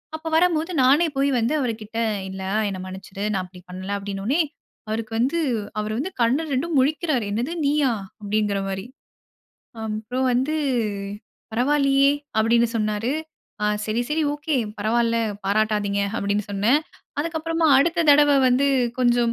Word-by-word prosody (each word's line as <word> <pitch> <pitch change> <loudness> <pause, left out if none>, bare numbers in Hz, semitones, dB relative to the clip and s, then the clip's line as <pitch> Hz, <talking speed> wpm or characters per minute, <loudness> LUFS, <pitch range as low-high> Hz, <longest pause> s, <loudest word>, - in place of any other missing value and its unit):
அப்ப 315 +1 -7
வரம்போது, 335 -1 +2
நானே 285 +7 +5
போய் 280 +1 +3
வந்து 235 +6 +1
அவருக்கிட்ட 225 -2 -3 0.3
இல்ல 190 0 -6 0.3
என்ன 190 -2 -5
மன்னிச்சிடு. 190 +1 -7
நான் 190 - 0
அப்பிடி 180 0 -13
பண்ல, 185 +2 -6
அப்பிடின்னவுனே, 200 - -1 0.5
அவருக்கு 220 0 -3
வந்து 270 +8 +1 0.4
அவரு 215 0 -2
வந்து 370 +7 -3
கண்ணு 255 +7 +2
2ம் 310 +4 0
முழிக்கிறாரு. 295 -3 0
என்னது 245 +10 -2
நீயா! 285 -3 +2 0.3
அப்பிடிங்கிறமாரி. 200 -1 -1 1.0
அப்புறம் 220 +5 -2
வந்து 265 +6 +1 1.0
பரவால்லையே! 275 +3 +3 0.3
அப்பிடின்னு 230 +1 +3
சொன்னாரு. 215 +2 -1 0.5
ஆ - - +2 0.2
சரி, 220 +2 -1
சரி, 310 +1 0
ஓகே. 295 +1 -2 0.2
பரவால்ல. 230 +2 +1 0.3
பாராட்டாதீங்க 205 0 +1 0.2
அப்பிடின்னு 200 +1 0
சொன்னேன். 220 +9 +3 0.4
அதுக்கப்பறமா, 325 +1 -1
அடுத்த 335 +3 +2
தடவ 290 0 +6 0.2
வந்து 260 +3 +3 0.3
கொஞ்சம் 240 -1 +3
235 Hz, 125 wpm, -23 LUFS, 210-290 Hz, 1.0 s, தடவ